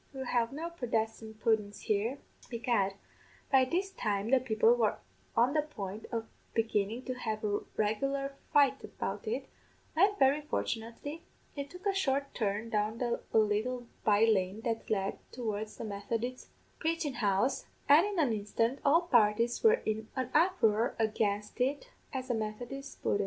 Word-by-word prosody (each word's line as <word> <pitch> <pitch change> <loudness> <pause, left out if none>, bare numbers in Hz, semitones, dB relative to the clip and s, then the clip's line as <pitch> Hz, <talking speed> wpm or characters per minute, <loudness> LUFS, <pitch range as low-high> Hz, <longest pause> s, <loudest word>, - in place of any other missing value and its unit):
We'll 265 -1 -4
have 240 -2 +1
no 325 +5 -4
Prodestan' 225 -6 -2
puddens 215 -2 0
here.' 215 +6 0 0.3
"Begad, 230 -5 0 0.6
by 265 -1 +6
this 370 +8 -1
time 210 - -1
the 265 - +6
people 255 - +4
were 485 - +2 0.4
on 245 +4 +4
the 305 - +3
point 215 -8 -6
of 225 -1 -2 0.3
beginnin' 225 +1 0
to 255 - -2
have 220 -4 -3
a 205 -1 +1 0.2
regular 275 +6 0 0.2
fight 285 -2 +4
about - - -5
it, 450 - -2 0.5
when, 395 +5 +4
very 275 0 +4
fortunately, 285 +2 -4 0.3
it 280 -1 -4
took 360 +5 -12
a 400 - +3
short 280 -7 0
turn 215 +1 -1
down 215 +1 0
a 240 -2 -1
little 220 +4 +1 0.2
by 210 +1 +5
lane 200 -1 +1
that 225 -1 -2
led 195 -2 0
towards 215 -3 -4
the - - -5
Methodist 225 +5 -3 0.3
praichin 320 -4 -1
house, 205 +4 +1 0.2
an' 295 +4 +8
in 410 -1 -2
an 285 -8 +3
instant 225 +5 0
all 310 +4 +5
parties 235 -5 +3
were 455 +2 +5
in 215 0 -1
an 260 -2 -2
uproar 250 - +3
against 210 0 0
it 285 - 0 0.2
as 260 -2 -3
a - - +2
Methodist 230 +5 -5
pudden. 205 - +2
235 Hz, 155 wpm, -32 LUFS, 215-275 Hz, 0.6 s, an